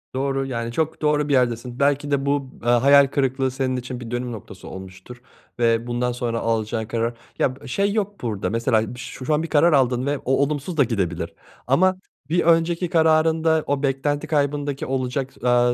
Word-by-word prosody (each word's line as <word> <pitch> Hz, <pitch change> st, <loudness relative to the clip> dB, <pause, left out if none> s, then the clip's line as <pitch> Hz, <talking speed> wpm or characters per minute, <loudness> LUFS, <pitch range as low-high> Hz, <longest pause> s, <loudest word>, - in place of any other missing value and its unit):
Doğru, 135 Hz, 0 st, -1 dB
yani, 115 Hz, -3 st, -3 dB
çok 160 Hz, +5 st, -2 dB
doğru 150 Hz, -1 st, +2 dB
bir -, -, +2 dB
yerdesin. 120 Hz, -1 st, 0 dB
Belki 145 Hz, +1 st, +1 dB
de 140 Hz, -1 st, +1 dB
bu, 140 Hz, -2 st, -1 dB
eee, 120 Hz, -, 0 dB
hayal 140 Hz, +3 st, +6 dB
kırıklığı 135 Hz, -1 st, 0 dB
senin 130 Hz, 0 st, -1 dB
için 125 Hz, 0 st, -6 dB
bir 120 Hz, -1 st, -8 dB
dönüm 120 Hz, 0 st, -3 dB
noktası 100 Hz, -4 st, -10 dB
olmuştur 95 Hz, +6 st, -10 dB, 0.4 s
ve 115 Hz, 0 st, +2 dB
bundan 120 Hz, +1 st, -1 dB
sonra 120 Hz, -1 st, -2 dB
alacağın 110 Hz, 0 st, -1 dB
karar 115 Hz, +1 st, -1 dB, 0.3 s
Ya, 130 Hz, -1 st, +1 dB
b -, -, -10 dB
şey 200 Hz, +9 st, 0 dB
yok 205 Hz, -2 st, -2 dB
burada, 105 Hz, -6 st, -2 dB
mesela 115 Hz, 0 st, +1 dB
ş 125 Hz, +1 st, -8 dB
şu 155 Hz, -, +1 dB
an 155 Hz, +2 st, +1 dB
bir -, -, -3 dB
karar 160 Hz, +1 st, +4 dB
aldın 130 Hz, -1 st, +2 dB
ve 145 Hz, 0 st, 0 dB
o 130 Hz, -, -4 dB
olumsuz 150 Hz, +4 st, -3 dB
da 140 Hz, -, +6 dB
gidebilir 100 Hz, -8 st, -2 dB, 0.3 s
ama 185 Hz, +8 st, +3 dB, 0.3 s
bir 175 Hz, +2 st, +2 dB
önceki 170 Hz, +1 st, +2 dB
kararında 160 Hz, 0 st, +3 dB
o 145 Hz, 0 st, -1 dB
beklenti 145 Hz, +3 st, 0 dB
kaybındaki 145 Hz, -2 st, -1 dB
olacak, 130 Hz, 0 st, -2 dB
aaa, 120 Hz, 0 st, +3 dB
135 Hz, 185 wpm, -22 LUFS, 120-145 Hz, 0.4 s, hayal